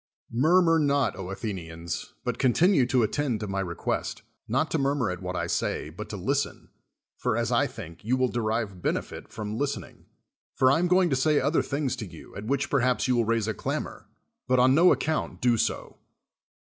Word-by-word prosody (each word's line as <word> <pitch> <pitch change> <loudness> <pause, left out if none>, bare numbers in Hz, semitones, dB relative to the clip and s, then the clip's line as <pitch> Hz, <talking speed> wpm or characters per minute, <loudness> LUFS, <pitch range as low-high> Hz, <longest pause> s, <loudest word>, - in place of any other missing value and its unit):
]\Iurmur 165 +5 +4
not, 140 -2 +2
Athenians, 90 -4 -5
but 125 -1 -2
continue 140 - +4
to 125 -2 +3
at 110 - 0
tend 140 -7 -1
to 105 - -3
my 95 0 -2
request, 85 -3 -3 0.2
not 135 +8 0
to 160 - +1
murmur 135 -5 +1
at 90 0 -6
what 90 0 -4
I - - -1
say, - - -2
but - - -8
to - - -5
listen, - - -2 0.5
for, - - 0
as - - 0
I - - +3
think, 85 +4 -10
you 125 +5 +1
will 130 0 +2
de 120 -1 -2
rive 110 -4 -2
benefit - - -3
from 110 +1 -5
listening. 145 0 -4 0.5
For 130 -1 +4
I 160 - +3
am 180 - +2
going 180 -1 +3
to - - +3
say 150 +3 +3
other 145 +5 +2
things 140 -3 -2
to 110 -4 -5
you, 85 -2 -13
at 100 - -6
which 140 +5 -1
perhaps 125 -2 +2
you 125 - +2
will 120 -1 +2
raise 115 -1 +1
a 110 - 0
clamor; - - -4 0.4
but 130 0 +3
on 130 +1 +5
no 170 +5 +6
account 155 0 -1
do 120 -1 +3
so. - - -2
125 Hz, 200 wpm, -27 LUFS, 105-140 Hz, 0.5 s, no